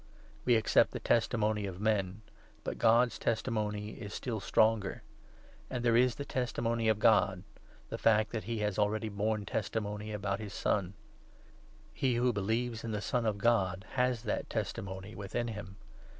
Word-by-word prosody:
We 125 - +5
9 - - +6
accept - - +4
the - - -3
testimony 110 -3 +1
of 95 -1 -7
men, 105 -1 0 0.4
but - - -4
God's 115 +1 +4
testimony 105 -2 -1
is 105 -3 -7
still 115 -4 -3
stronger; 110 -1 +2 0.7
and 125 -2 -3
there 115 -1 +4
is 125 0 +4
the 140 - -5
testimony 115 -3 -1
of 110 - +3
God 100 -4 +3 0.2
— - - -26
the - - -4
fact 110 -1 +3
that 110 -2 -4
he 115 +1 -2
has 105 -1 -1
already 105 +1 +1
borne 105 +1 -1
testimony 105 0 -3
about 100 -1 -2
his 105 -3 -7
Son. 100 -2 0 1.0
He 130 -3 +1
who 120 +1 +2
believes 110 +3 -1
10 - - -6
in 110 - -3
the 105 - -1
Son 115 +2 0
of 105 -2 0
God 100 -4 +1
has 125 -2 +1
that 110 - -2
testimony 95 +1 -4
within 100 +5 -3
him. 100 -3 -7
110 Hz, 170 wpm, -32 LUFS, 105-115 Hz, 1.0 s, 9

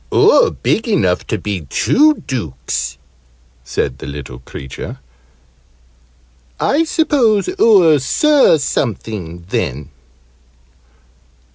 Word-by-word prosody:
"Oo're 465 +3 +5
big 225 - -1
enough 150 - 0
to 110 - -1
be 95 -5 -5
two 305 - +3
Dukes," 65 - -4 0.7
said 65 +1 -3
the 65 - -8
little 70 -4 -8
creature. 65 +1 -8 1.6
"I 320 +3 +1
suppose 270 -10 +1
oo're 180 - +5
Sir 285 - +3
Something, 105 - -4
then?" 75 -3 -3
110 Hz, 90 wpm, -16 LUFS, -, 1.6 s, Oo're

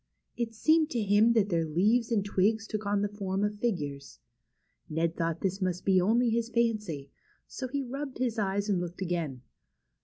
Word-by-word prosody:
It 230 -2 -3
seemed 315 +6 +3
to 245 - -1
him 205 +3 +4
that 210 -3 +2
their 170 -3 +1
leaves 210 +10 +2
and 205 -3 +1
twigs 210 +3 +1
took 215 -1 -3
the 205 0 +1
form 195 0 -1
of 210 0 -1
figures. 145 -12 -3 0.7
Ned 165 +1 0
thought 165 0 -2
this 190 +1 -1
must 180 -1 -1
be 190 -2 +4
only 230 +5 +3
his 230 0 0
fancy, 210 - -1 0.3
so 260 - -5
he 280 +2 -2
rubbed 270 +2 -5
his 240 -3 -1
eyes 200 0 0
and 195 -4 +1
looked 175 +2 -5
again. 165 -8 -3
205 Hz, 180 wpm, -29 LUFS, 175-230 Hz, 0.7 s, him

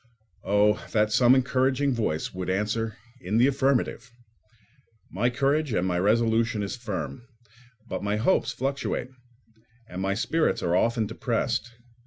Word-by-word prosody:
Oh, 105 +2 +2
that 105 -1 +2
some 125 +2 +5
encouraging 130 +1 +1
voice 95 -10 -2
would 90 0 -4
answer 110 +3 -1 0.2
in 95 +5 -2
the 120 - +5
affirmative! 135 -2 0 1.0
My 110 +7 +1
courage 140 +2 0
and 90 -2 +1
my 90 -1 0
resolution 115 +2 +2
is 100 - -4
firm; 95 - -5 0.7
but - - -4
my 105 +1 0
hopes 115 - +1
fluctuate, 135 -2 -3 0.8
and 90 -1 -6
my 95 +1 0
spirits 160 +9 0
are 85 0 +1
often 115 +3 +2
depressed. 115 +2 -2
115 Hz, 135 wpm, -26 LUFS, 100-130 Hz, 1.0 s, some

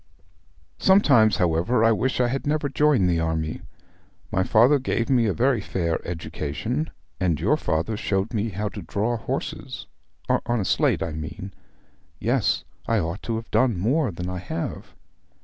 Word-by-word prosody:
'Sometimes, 140 - +5
however, 90 +6 +2
I 115 - +5
wish 125 +4 0
I 125 - +3
had 135 +3 -3
never 150 0 +1
joined 140 -8 +3
the 85 -2 +1
army. 80 -1 -2 0.7
My 95 - +1
father 120 +9 +4
gave 120 -1 -1
me 120 -4 +4
a - - +2
very 125 -1 +2
fair 85 -4 -1
education, 80 - -3 0.3
and 85 -5 +1
your - - +3
father 80 +8 -1
showed 100 +2 -1
me 110 0 0
how 105 +2 -3
to 100 - -8
draw 105 +7 -1
horses 115 - -5 0.4
on 120 0 +1
a 100 - -1
slate, - - +2
I 80 - -3
mean. 80 +5 -7 0.7
Yes, - - +1 0.2
I 115 - +2
ought 85 0 -2
to 115 - -3
have 115 +1 -6
done 125 -6 +3
more 130 - +1
than 90 -1 -5
I 90 0 -4
have.' 85 -2 -5
105 Hz, 165 wpm, -24 LUFS, 85-120 Hz, 0.7 s, Sometimes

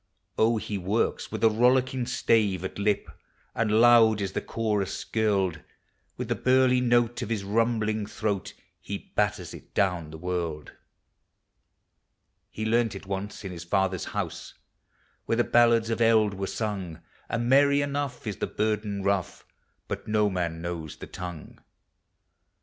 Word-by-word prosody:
Oh, 115 +1 +3
he 105 -2 -4
works 100 +5 -1
with - - -4
a 115 - +7
rollicking 125 +2 +2
stave 105 -7 +1
at 95 - -6
lip, 105 0 +1 0.5
And 110 -1 +2
loud 115 -2 +6
is 100 -2 -2
the - - -2
chorus 105 -4 -1
skirled; 100 -6 0 0.6
With - - -4
the - - +1
burly 130 0 +3
note 120 -1 +2
of - - -4
his 110 -4 -1
rumbling 110 0 0
throat 105 -2 -3 0.2
He 100 -1 -7
batters 105 -4 0
it - - -13
down 90 -5 +1
the 80 - -9
world. 85 -3 -3 1.8
He 110 - -5
learned 115 -1 +1
it 100 - -8
once 100 +2 -5
in 95 - -4
his 85 -2 -7
father's 95 0 0
house, - - -5 0.7
Where - - +2
the 120 - +4
ballads 115 -1 +4
of 115 - -1
eld 110 -2 +4
were 95 0 -4
sung; 100 -7 -3
O - - -15
7 - - -26 0.3
And 120 +1 -1
merry 140 +1 +5
enough 140 -3 -3
is 105 -3 -3
the - - -2
burden 105 -2 -1
rough, 100 -3 -1 0.4
But - - -5
no 105 -1 +2
man 85 -3 -3
knows 85 -3 -5
the - - -8
tongue. 90 -3 -8
105 Hz, 155 wpm, -27 LUFS, 95-115 Hz, 1.8 s, a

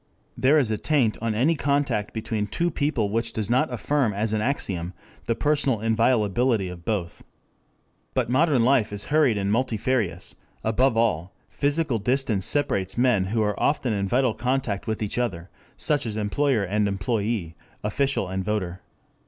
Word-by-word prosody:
There 140 +4 +4
is 130 -7 +2
a 110 - -1
taint 135 -8 +2
on 115 -2 -1
any 135 +9 +3
contact 140 -8 0
between 110 -1 -3
two 170 +10 0
people 140 -9 0
which 115 +1 -1
does 110 0 -2
not 130 +1 +2
affirm 125 0 0
as 105 +2 -1
an 110 - 0
axiom 95 -8 -2 0.3
the 115 - 0
personal 140 -3 +1
inviolability 115 -1 +2
of 90 -1 -9
both. 95 -6 -3 0.9
But - - +1
modern 130 -1 +3
life 125 -5 +3
is 105 0 -6
hurried 145 -8 +4
and 100 0 -1
multifarious, 115 -5 0 0.3
above 120 +2 +2
all 95 -6 0
physical 145 -4 0
distance 120 -4 0
separates 110 -11 -1
men 120 -6 +3
who 110 +3 0
are 105 -1 -1
often 135 -5 +1
in 100 -1 -1
vital 125 +2 +2
contact 125 -3 -2
with 110 0 -2
each 105 +3 -2
other, 95 -8 -3 0.3
such 145 -4 0
as 110 -1 -3
employer 115 +2 +1
and 105 +2 0
employee, 100 -2 -2 0.3
official 135 0 0
and 95 +1 -3
voter. 95 -3 -2
115 Hz, 160 wpm, -25 LUFS, 105-130 Hz, 0.9 s, There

